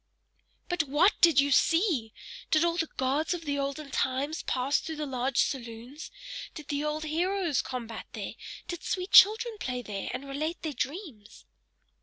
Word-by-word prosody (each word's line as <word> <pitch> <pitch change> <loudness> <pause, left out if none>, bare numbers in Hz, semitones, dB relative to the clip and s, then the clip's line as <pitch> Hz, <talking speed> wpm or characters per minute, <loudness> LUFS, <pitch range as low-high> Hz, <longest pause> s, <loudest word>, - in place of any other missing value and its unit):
"But 350 -3 0
WHAT 325 +9 +5
DID 335 -5 +6
you 280 +1 +3
see? 320 - +3 0.4
Did 315 +1 +4
all 340 -1 +1
the 330 -2 -1
gods 280 +6 +1
of 335 -2 -8
the 285 -1 -1
olden 275 +1 -4
times 275 +4 -1
pass 260 +3 +1
through 320 - -6
the 300 0 -3
large 260 -2 -2
saloons? 240 +2 -2 0.5
Did 305 -3 -9
the 290 0 -1
old 300 +1 -2
heroes 340 -1 0
combat 235 -3 -6
there? - - -5 0.3
Did 345 -2 -5
sweet 365 0 -2
children 440 +2 +7
play 250 -1 -3
there, 200 -3 -5
and 275 - -5
relate 310 +5 -3
their 310 -2 -2
dreams?" 275 - -6
295 Hz, 165 wpm, -29 LUFS, 260-335 Hz, 0.5 s, children